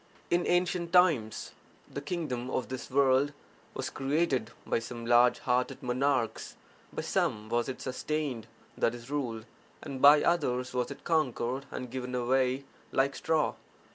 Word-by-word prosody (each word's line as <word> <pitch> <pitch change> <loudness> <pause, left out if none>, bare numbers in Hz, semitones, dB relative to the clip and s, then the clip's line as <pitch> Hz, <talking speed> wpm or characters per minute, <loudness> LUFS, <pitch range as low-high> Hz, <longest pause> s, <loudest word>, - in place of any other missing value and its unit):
In 175 0 +2
ancient 175 -1 +1
times 160 -12 +3 0.4
(the - - -6
kingdom 130 -9 -3
of) 130 - -2
this 130 -1 -6
world 135 +1 +3 0.4
was - - -3
created 135 -4 0 0.2
by - - +1
some 115 0 -7
large 120 +1 +5
hearted 125 0 -1
monarchs; 125 -2 0 0.4
by - - -4
some 105 0 0
was 120 +2 0
it 130 - -6
sustained 130 -3 -3 0.4
(i.e., 120 +1 +2
ruled) 125 -6 -3 0.4
and 130 -1 -6
by 145 +1 +8
others 125 -8 +1
was 125 -1 0
it 140 - -9
conquered 135 -5 0
and 125 -2 -6
given 125 -1 -4
away 130 +2 +1 0.3
like 135 +1 +1
straw. 160 -2 +1
130 Hz, 140 wpm, -30 LUFS, 125-145 Hz, 0.4 s, by